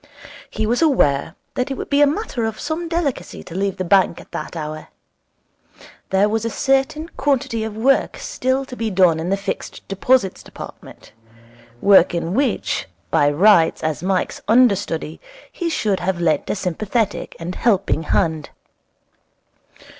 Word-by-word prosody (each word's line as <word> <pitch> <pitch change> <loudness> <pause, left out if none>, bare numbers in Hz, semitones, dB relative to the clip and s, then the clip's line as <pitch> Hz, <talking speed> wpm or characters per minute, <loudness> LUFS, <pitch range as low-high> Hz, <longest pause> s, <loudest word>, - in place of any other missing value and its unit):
He 220 - -2
was 240 +6 +1
aware 160 - +2 0.2
that 255 0 -2
it 270 - -2
would - - -6
be 285 +1 +4
a 290 - +7
matter 290 - -2
of 220 -1 -4
some 320 +3 -3
delicacy 330 -6 -2
to 170 - -11
leave 195 +1 -1
the 185 - -2
bank 185 -1 +3
at - - -15
that - - -6
hour. 155 -1 -6 1.2
There 195 +2 +3
was 220 +1 -1
a 230 - -1
certain 270 +6 0
quantity 260 -5 0
of 220 -1 -5
work 265 +5 +2
still 260 +2 -1
to 255 - -9
be 225 -2 -2
done 180 -5 +3
in 165 +2 -3
the 195 - +1
Fixed 200 - -6
Deposits 195 +1 +1
Department - - -12 0.7
work 190 -3 +5
in 170 +1 -2
which, 265 0 0 0.2
by 145 - +4
rights, 170 +2 +4
as 155 -1 -1
Mike's 185 +1 -1
understudy, 200 -9 +2 0.3
he 345 -2 -3
should 210 - 0
have 180 0 -1
lent 160 -4 +1
a - - 0
sympathetic 205 +3 -2
and 170 +2 -5
helping 200 -8 +1
hand. 160 -2 0
205 Hz, 155 wpm, -20 LUFS, 175-260 Hz, 1.2 s, a